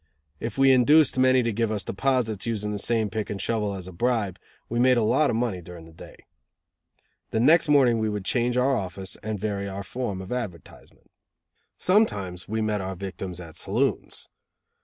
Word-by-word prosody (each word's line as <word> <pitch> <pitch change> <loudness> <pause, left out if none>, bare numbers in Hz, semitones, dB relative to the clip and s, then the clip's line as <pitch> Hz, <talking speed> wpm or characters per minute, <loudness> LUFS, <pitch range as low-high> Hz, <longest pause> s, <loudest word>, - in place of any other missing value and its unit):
If 115 -2 -5
we 135 0 +6
induced 130 +2 +5
many 130 -1 +4
to 115 -1 -1
give 115 +1 0
us 105 -2 -2
deposits, 120 -2 -1
using 105 -2 -2
the 105 - -3
same 110 -2 0
pick 110 0 -3
and 100 - -4
shovel 105 -3 -1
as 95 -1 -7
a - - -8
bribe, 105 -1 -1 0.3
we 120 - -2
made 125 0 +4
a 115 - +2
lot 145 +7 +3
of - - 0
money 115 -6 -1
during 85 -1 -11
the 80 - -15
day. 80 - -13 1.1
The 110 - -1
next 160 +6 +5
morning 130 -6 +4
we 110 0 0
would 105 -2 -4
change 120 +2 0
our 135 +2 +3
office 95 -1 -4
and 110 0 -3
vary 100 -1 -3
our 100 +1 -5
form 105 -1 -4
of 95 0 -8
advertisement. 105 - -7 0.7
Sometimes 100 - +1
we 110 +1 -2
met 105 -2 -1
our 95 0 -4
victims 95 -1 -6
at 85 -3 -10
saloons. - - -2
110 Hz, 190 wpm, -25 LUFS, 95-125 Hz, 1.1 s, we